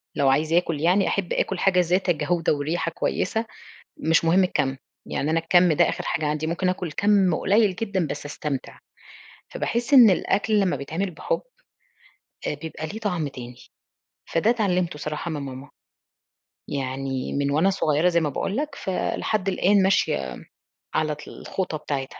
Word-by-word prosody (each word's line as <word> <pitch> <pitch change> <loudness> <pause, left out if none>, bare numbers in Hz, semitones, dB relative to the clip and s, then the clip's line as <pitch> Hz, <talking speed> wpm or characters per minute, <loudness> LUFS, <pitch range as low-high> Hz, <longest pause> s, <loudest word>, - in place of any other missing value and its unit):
لو 140 -1 +3
عايزة 155 +5 +2
آكل 165 -4 0
يعني 185 +4 +3
أحب 195 -3 -1
آكل 190 -2 -1
حاجة 190 -2 +3
ذات 180 +2 +1
جودة 165 +1 +1
وريحة 160 +3 -2
كويسة، 220 +6 -1 0.7
مش 165 - +4
مهم 180 +3 +4
الكَم، 140 -7 0 0.3
يعني 150 - -2
أنا 165 - +2
الكَم 175 +1 +4
ده 150 - +3
آخر - - -3
حاجة 160 -2 -1
عندي، 150 +1 -1
ممكن 175 +3 -1
آكل 180 -3 -2
كَم 195 -3 +3
قليّل 205 +1 +2
جدًا 200 -7 -1
بس 145 - -5
أستمتع، 145 -2 -5 0.7
فباحس 240 +4 -1
إن 240 -6 +9
الأكل 210 +3 +1
لمّا 180 -7 +1
بيتعمل 165 +8 -3
بحُب - - -2 1.1
آآ، - - -1
بيبقى 160 +1 -6
ليه 215 +8 -7
طعم 180 -8 -1
تاني، 125 -2 -9 0.8
فده 165 +7 +3
اتعلمته 185 -9 0
صراحة 150 +3 -4
من 150 -3 -3
ماما، 135 +1 -8 1.0
يعني 135 -1 -3
من 140 0 0
وأنا 160 +7 +3
صغيرة 155 -2 +2
زي 170 -1 +2
ما 155 - 0
باقول 195 - -2
لك 295 0 -2
فلحد 195 -1 -2
الآن 195 +1 +3
ماشية 65 - +1 0.6
على 155 -1 +1
طل 150 - -11
الخطى 180 -5 -4
بتاعتها. 140 -3 -5
170 Hz, 160 wpm, -24 LUFS, 150-195 Hz, 1.1 s, إن